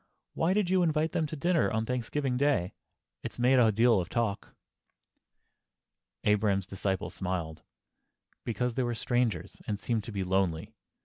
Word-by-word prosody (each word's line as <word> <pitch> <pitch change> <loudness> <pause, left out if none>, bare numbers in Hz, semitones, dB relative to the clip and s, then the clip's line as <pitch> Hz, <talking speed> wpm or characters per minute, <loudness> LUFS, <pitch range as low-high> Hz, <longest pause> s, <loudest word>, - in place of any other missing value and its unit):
—why 165 - +1
did 205 -1 +2
you 190 -1 +4
invite 160 -1 +1
them 160 - 0
to 155 - -6
dinner 170 +3 +2
on 110 0 -1
Thanksgiving 125 +2 -1
Day? 125 -10 +1 0.5
It's - - -7
made 125 +2 +4
a 115 -3 +5
deal 115 0 +4
of 85 - -7
talk." 115 -4 -2 1.7
Abraham's 105 -2 +2
disciple 95 +1 -2
smiled. 90 -4 -4 0.8
"Because 120 +2 -1
they 130 - -1
were 120 -1 -1
strangers, 120 -7 -1
and 105 -2 -2
seemed 110 0 -1
to - - -6
be 100 -2 -2
lonely. 90 -3 0
115 Hz, 150 wpm, -29 LUFS, 100-130 Hz, 1.7 s, a